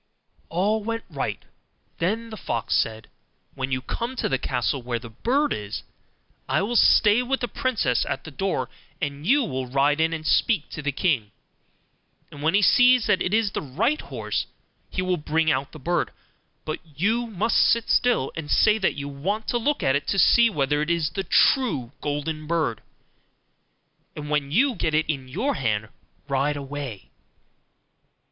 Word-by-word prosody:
All 205 Hz, +6 st, 0 dB
went 230 Hz, +1 st, -3 dB
right: -, -, -4 dB, 0.5 s
then 225 Hz, +7 st, -1 dB
the -, -, -5 dB
fox 115 Hz, -, -2 dB
said, 110 Hz, 0 st, -1 dB, 0.5 s
'When 135 Hz, 0 st, -4 dB
you 130 Hz, -1 st, -1 dB
come 235 Hz, -, -4 dB
to -, -, -1 dB
the 135 Hz, -, 0 dB
castle 130 Hz, +1 st, -1 dB
where 120 Hz, 0 st, -2 dB
the 115 Hz, -1 st, -10 dB
bird 265 Hz, -, +1 dB
is, 105 Hz, -1 st, -5 dB, 0.7 s
I -, -, +2 dB
will 235 Hz, +4 st, -2 dB
stay 220 Hz, 0 st, +5 dB
with 265 Hz, +2 st, -1 dB
the 245 Hz, -, 0 dB
princess 230 Hz, -, 0 dB
at -, -, -3 dB
the 160 Hz, -, -9 dB
door, 190 Hz, +7 st, -1 dB, 0.3 s
and 145 Hz, 0 st, -4 dB
you 280 Hz, +4 st, +4 dB
will 130 Hz, -, -3 dB
ride 140 Hz, +4 st, +2 dB
in 160 Hz, 0 st, +2 dB
and 160 Hz, -1 st, -5 dB
speak 200 Hz, -2 st, +2 dB
to 150 Hz, -, -5 dB
the 145 Hz, 0 st, -1 dB
king; 135 Hz, -, 0 dB, 1.0 s
and 145 Hz, -, -10 dB
when 160 Hz, +5 st, +2 dB
he 205 Hz, -, +4 dB
sees 245 Hz, +2 st, +5 dB
that 185 Hz, -, +2 dB
it 180 Hz, -, 0 dB
is 215 Hz, -2 st, +2 dB
the -, -, -3 dB
right 215 Hz, -, 0 dB
horse, -, -, -3 dB, 0.4 s
he 185 Hz, -, -2 dB
will 185 Hz, -1 st, 0 dB
bring 155 Hz, +1 st, +1 dB
out 135 Hz, +1 st, -1 dB
the -, -, -10 dB
bird; 170 Hz, +4 st, -1 dB, 0.6 s
but 155 Hz, -, -3 dB, 0.2 s
you 225 Hz, +9 st, +1 dB
must 220 Hz, +1 st, 0 dB
sit 235 Hz, -1 st, +3 dB
still, 245 Hz, -, +2 dB
and 160 Hz, -3 st, -6 dB
say 215 Hz, +6 st, +4 dB
that 190 Hz, -, +1 dB
you 140 Hz, -1 st, -5 dB
want 190 Hz, +11 st, -3 dB
to 240 Hz, -, +1 dB
look 290 Hz, +5 st, 0 dB
at 135 Hz, -, +3 dB
it, 145 Hz, -, -2 dB
to 195 Hz, -, 0 dB
see 235 Hz, +5 st, +6 dB
whether 145 Hz, -5 st, 0 dB
it 150 Hz, -, -2 dB
is 165 Hz, -3 st, +1 dB
the 195 Hz, -, -3 dB
true 180 Hz, -, +2 dB
golden 150 Hz, +1 st, -3 dB
bird; 155 Hz, -10 st, 0 dB, 1.3 s
and 150 Hz, 0 st, -6 dB
when 145 Hz, -2 st, 0 dB
you 260 Hz, -, +3 dB
get 155 Hz, -8 st, -1 dB
it 155 Hz, -, +2 dB
into 135 Hz, -4 st, -3 dB
your 255 Hz, -, 0 dB
hand, 110 Hz, -, -1 dB, 0.4 s
ride 140 Hz, +1 st, 0 dB
away. 140 Hz, -6 st, -7 dB
160 Hz, 180 wpm, -24 LUFS, 140-220 Hz, 1.3 s, see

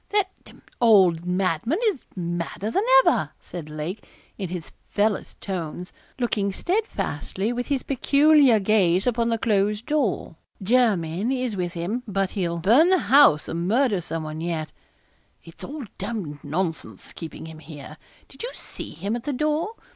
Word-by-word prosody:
'That 405 Hz, -2 st, +1 dB
d -, -, -14 dB
d -, -, -18 dB, 0.2 s
old 185 Hz, -7 st, +5 dB
madman 185 Hz, -, 0 dB
is 360 Hz, -11 st, -5 dB
madder 175 Hz, +3 st, -3 dB
than 390 Hz, -, +2 dB, 0.2 s
ever,' -, -, +2 dB
said 165 Hz, -4 st, -8 dB
Lake, 155 Hz, +7 st, -5 dB, 0.3 s
in 190 Hz, -4 st, -5 dB
his 175 Hz, -2 st, -6 dB, 0.2 s
fellest 210 Hz, 0 st, -1 dB
tones, 180 Hz, -2 st, -5 dB, 0.2 s
looking 215 Hz, -5 st, 0 dB
steadfastly 225 Hz, -, -2 dB
with 245 Hz, 0 st, -3 dB
his 280 Hz, -3 st, -1 dB
peculiar 280 Hz, -2 st, +4 dB
gaze 190 Hz, -3 st, +3 dB
upon 235 Hz, -1 st, +1 dB
the 230 Hz, -, +1 dB
closed 210 Hz, 0 st, +1 dB
door. 275 Hz, -, -1 dB, 0.2 s
'Jermyn 205 Hz, -3 st, +1 dB
is 250 Hz, -4 st, -1 dB
with 180 Hz, -2 st, -2 dB
him, 185 Hz, +8 st, -3 dB
but 195 Hz, -2 st, -1 dB
he'll 175 Hz, -4 st, -2 dB
burn 235 Hz, -, +5 dB
the 375 Hz, -, +5 dB, 0.2 s
house 280 Hz, -, +6 dB
or -, -, -4 dB
murder 200 Hz, +5 st, +1 dB
some 165 Hz, -1 st, -4 dB
one 155 Hz, 0 st, -6 dB
yet. 160 Hz, -2 st, -3 dB, 0.7 s
It's 165 Hz, -, -13 dB
all 295 Hz, 0 st, -6 dB
d 215 Hz, -, -11 dB
d 195 Hz, -8 st, -4 dB
nonsense 165 Hz, +3 st, -4 dB
keeping 160 Hz, -2 st, -8 dB
him 160 Hz, -1 st, -10 dB
here 150 Hz, -3 st, -10 dB, 0.3 s
did -, -, -13 dB
you 485 Hz, -, -3 dB
see -, -, -7 dB
him 205 Hz, +3 st, -2 dB
at 240 Hz, -, -4 dB
the 290 Hz, -, -3 dB
door? 305 Hz, -, -1 dB
200 Hz, 160 wpm, -24 LUFS, 170-245 Hz, 0.7 s, house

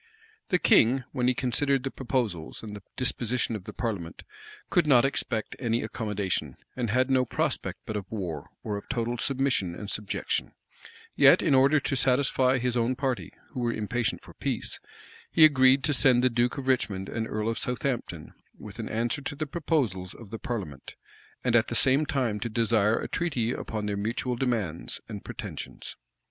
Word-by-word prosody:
The 180 Hz, -, +4 dB
king, 130 Hz, -5 st, +4 dB
when 125 Hz, -1 st, 0 dB
he 125 Hz, -, +3 dB
considered 130 Hz, +2 st, +1 dB
the 135 Hz, -, -3 dB
proposals, 115 Hz, -, -3 dB
and 105 Hz, -2 st, -7 dB
the 105 Hz, -, -9 dB
disposition 125 Hz, -2 st, 0 dB
of 100 Hz, -4 st, -7 dB
the -, -, -6 dB
parliament, 100 Hz, -9 st, -4 dB, 0.5 s
could 175 Hz, -3 st, +3 dB
not 130 Hz, -3 st, +6 dB
expect 120 Hz, -5 st, -2 dB
any 120 Hz, -2 st, 0 dB
accommodation, 100 Hz, -, -2 dB, 0.2 s
and 120 Hz, -3 st, -2 dB
had 130 Hz, +4 st, +2 dB
no 130 Hz, -1 st, +4 dB
prospect 125 Hz, -, -2 dB
but 110 Hz, -, -4 dB
of 100 Hz, -3 st, -5 dB
war, 95 Hz, -7 st, -4 dB
or 105 Hz, -2 st, -2 dB
of 100 Hz, -, -10 dB
total 120 Hz, -1 st, -1 dB
submission 135 Hz, -11 st, 0 dB
and 105 Hz, -, -7 dB
subjection: 105 Hz, -1 st, -2 dB, 0.6 s
yet, -, -, +7 dB
in -, -, +3 dB
order 135 Hz, +3 st, +5 dB
to 135 Hz, -, -1 dB
satisfy 130 Hz, 0 st, +3 dB
his 125 Hz, 0 st, -1 dB
own 120 Hz, +2 st, +1 dB
party, 130 Hz, -2 st, -2 dB, 0.2 s
who -, -, -5 dB
were 120 Hz, -1 st, +1 dB
impatient 115 Hz, +1 st, -2 dB
for -, -, -13 dB
peace, -, -, -3 dB, 0.5 s
he 160 Hz, -, +7 dB
agreed 135 Hz, -2 st, +5 dB
to 150 Hz, -, +2 dB
send 125 Hz, -2 st, +5 dB
the 130 Hz, -, +4 dB
duke 120 Hz, +4 st, +1 dB
of 135 Hz, -, -4 dB
Richmond 100 Hz, -7 st, 0 dB
and 110 Hz, -1 st, -3 dB
earl 105 Hz, +1 st, -2 dB
of 115 Hz, -, -1 dB
Southampton 125 Hz, -, -3 dB, 0.2 s
with -, -, -10 dB
an -, -, -4 dB
answer 115 Hz, +5 st, -1 dB
to 145 Hz, +1 st, -4 dB
the 155 Hz, +2 st, -2 dB
proposals 135 Hz, -, -1 dB
of 110 Hz, -4 st, -12 dB
the 115 Hz, -, -5 dB
parliament, 95 Hz, -, -5 dB, 0.5 s
and 125 Hz, -2 st, +2 dB
at 115 Hz, -1 st, +4 dB
the -, -, -3 dB
same 140 Hz, +3 st, +3 dB
time 125 Hz, -8 st, 0 dB
to 115 Hz, -, -3 dB
desire 110 Hz, -1 st, +2 dB
a -, -, -4 dB
treaty 130 Hz, -10 st, -1 dB
upon 110 Hz, -4 st, -4 dB
their 105 Hz, -1 st, -2 dB
mutual 120 Hz, +4 st, -2 dB
demands 115 Hz, -10 st, -2 dB
and -, -, -7 dB
pretensions. -, -, -7 dB
120 Hz, 180 wpm, -27 LUFS, 110-130 Hz, 0.6 s, yet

